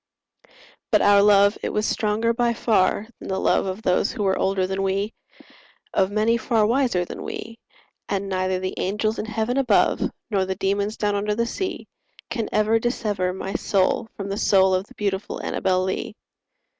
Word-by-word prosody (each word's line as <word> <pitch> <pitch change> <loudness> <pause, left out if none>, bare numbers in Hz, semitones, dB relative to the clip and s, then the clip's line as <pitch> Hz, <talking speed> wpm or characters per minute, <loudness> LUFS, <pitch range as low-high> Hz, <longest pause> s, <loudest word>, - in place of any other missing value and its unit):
But - - +4
our 200 0 +6
love 200 0 +5
it - - -2
was 210 0 -1
stronger 220 +2 0
by 235 0 +1
far 205 -2 +2
than - - -9
the 190 - -1
love - - +2
Of 190 +4 -5
those 180 +1 +2
who 225 -4 -3
were 190 -1 +2
older 190 -1 +1
than 190 +1 -2
we— 195 +3 -1 0.8
Of 190 -1 +2
many 215 +3 +2
far 225 -2 +1
wiser 235 -6 +1
than - - -8
we— 230 +1 -7 0.5
And 200 0 -1
neither 185 -1 0
the 185 0 -3
angels 210 +3 -1
in - - -3
heaven 220 +3 -2
above, 270 -2 +3 0.3
Nor 195 -2 +1
the 190 0 -3
demons 200 +3 -1
down 205 -1 0
under 210 +1 -1
the 235 +1 0
sea, 375 +11 -4 0.5
Can 230 -3 -2
ever 215 +2 +2
dissever 210 -6 -1
my 190 +1 -5
soul 195 +3 +1
from 200 -1 -5
the 200 - -3
soul 190 -2 +4
Of 185 +2 0
the - - -17
beautiful 200 -1 -2
Annabel 185 -1 0
Lee. 190 +3 -3
205 Hz, 180 wpm, -23 LUFS, 190-220 Hz, 0.8 s, our